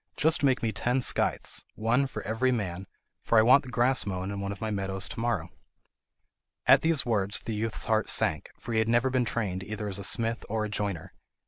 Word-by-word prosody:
Just 160 +1 +3
make 135 -4 +2
me 115 - +1
ten 125 +4 0
scythes, 125 - 0
one 120 +5 +1
for - - -7
every 115 +5 0
man, 95 -5 -3 0.3
for 115 - +1
I 110 - +7
want 130 +5 +6
the 130 - -10
grass 125 +2 +2
mown 95 -1 -4
in 100 - -5
one 100 0 -3
of 100 - -7
my 110 -1 -3
meadows 95 -1 -2
to - - -7
morrow." 120 0 -2 1.1
At - - +6
these 160 -3 +2
words 105 -4 0
the 110 - -5
youth's 110 +1 -3
heart 110 -1 +1
sank, 75 - 0
for - - -7
he 110 - +2
had 110 0 +1
never 120 +3 +2
been 125 -1 +1
trained 100 -6 -2
either 105 +1 -5
as 100 -1 -3
a - - -6
smith 115 +3 +2
or 110 0 -1
a - - -5
joiner. 100 -5 -4
110 Hz, 220 wpm, -28 LUFS, 100-120 Hz, 1.1 s, I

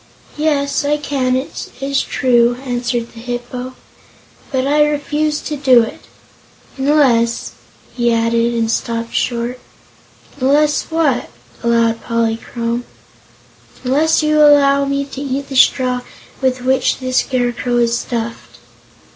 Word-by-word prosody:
"Yes; 290 -2 0
I 295 +1 +1
can, 270 -3 -1
it 260 +2 -4
is 275 0 0
true," 240 -2 +2
answered 240 -1 -2
the 230 - -11
Hip 245 +1 -5
po; 255 0 -6 0.8
"but 260 -1 0
I 295 +2 +4
refuse 295 +1 -1
to 300 - -4
do 260 -4 +5
it. - - -7 0.8
Unless 265 -5 +2 0.2
" - - -29
he 240 -1 +1
added, 230 +1 +1
and 225 -1 0
stopped 230 0 -3
short. 240 +1 -1 0.8
"Unless 290 +3 +2
what?" 315 -6 0 0.3
asked 230 -1 +2
Polychrome. 230 +1 -2 1.0
"Unless 300 +5 +2
you 305 0 +2
first 300 -1 +7
allow 280 -1 +4
me 280 0 -1
to 275 0 -8
eat 275 0 -3
the 270 - -6
straw 255 -1 +3 0.4
with 260 -1 0
which 260 +1 +2
the 255 -1 -5
Scarecrow 245 -1 0
is 235 -1 +2
stuffed." 235 -1 -5
255 Hz, 130 wpm, -17 LUFS, 235-280 Hz, 1.0 s, first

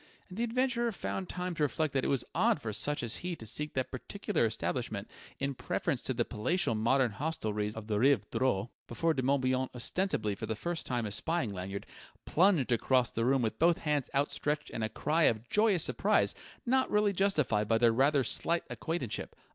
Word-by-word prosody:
And 185 +4 -8
the - - +1
adventurer 240 0 +1
found 190 -2 -4
time 180 0 -3
to 165 - -5
reflect 150 0 0
that 135 -1 +1
it - - 0
was 135 -4 +2
odd - - +3
for 110 -2 -4
such 145 +8 0
as 115 -1 -1
he 180 -1 -4
to 115 - -9
seek 150 +7 -3
that 130 -1 -1
particular - - -1
establishment - - -3 0.3
in 140 0 -2
preference - - -2
to - - -2
the - - +1
palatial 165 - 0
modern 120 +3 +2
hostelries 105 -5 -2
of 110 -1 -6
the 105 -1 0
Rive 125 -5 +3
Droit 120 -4 0 0.2
before 165 +7 0
De 135 - -1
Morbihan, 130 -1 +1
ostensibly 120 - -1
for 100 - -6
the 110 - -2
first 170 +8 -3
time 120 -3 -1
espying 120 +3 -1
Lanyard, 95 +1 -5 0.4
plunged 170 -7 +3
across 125 +1 +2
the 115 - -1
room 130 0 +3
with 110 - -2
both 170 +1 +4
hands 150 -4 -1
outstretched 150 +1 0
and 115 - -3
a 110 - 0
cry 155 +9 +1
of 110 +1 +1
joyous 210 -6 +3
surprise - - +2 0.3
not 260 +2 +2
really 210 -1 +2
justified 150 - +1
by 115 - +3
their 115 0 +4
rather 135 +3 +3
slight 170 +8 0
acquaintanceship. 160 -9 -3
135 Hz, 195 wpm, -31 LUFS, 115-170 Hz, 0.4 s, both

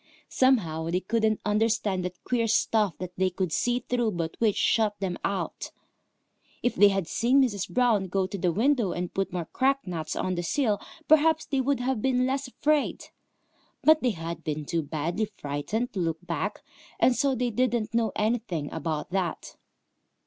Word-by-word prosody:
Somehow 170 -12 +2
they 180 +2 0
couldn't 220 +2 0
understand 210 -3 +1
that 180 0 -6
queer 235 -2 0
stuff 215 -3 +2
that 185 -1 -6
they 185 0 +2
could 185 -1 -2
see 245 +1 +1
through 240 -3 0
but 165 -2 -3
which 220 -3 +2
shut 210 -2 +2
them 190 -2 -2
out. 200 -1 -3 0.9
If 245 - +2
they 205 +2 +6
had 195 -4 0
seen 250 +4 +3
Mrs. 205 -7 -2
Brown 230 -6 +2
go 190 +1 0
to 200 +2 -5
the 175 -1 +1
window 230 - +2
and 180 0 -4
put 195 -1 -1
more 175 -2 -3
cracked 270 - 0
nuts 165 -4 -4
on 185 - -1
the 175 - -2
sill, 210 - 0 0.3
perhaps 315 +1 +4
they 275 -3 0
would 275 0 0
have 250 -3 -1
been 255 0 +2
less 270 +1 -1
afraid. 295 +3 0 0.8
But 310 0 +6
they 255 - +2
had 165 +1 -5
been 155 -1 -3
too 165 +2 -1
badly 160 +7 -2
frightened 150 +12 -3
to 195 - -3
look 165 0 -2
back, 185 +4 -3 0.4
and 255 - +4
so 275 0 +1
they 245 0 -1
didn't 235 -1 0
know 230 -1 +1
anything 210 -9 -1
about 160 +1 -3
that. 185 -3 -3
210 Hz, 180 wpm, -27 LUFS, 175-245 Hz, 0.9 s, they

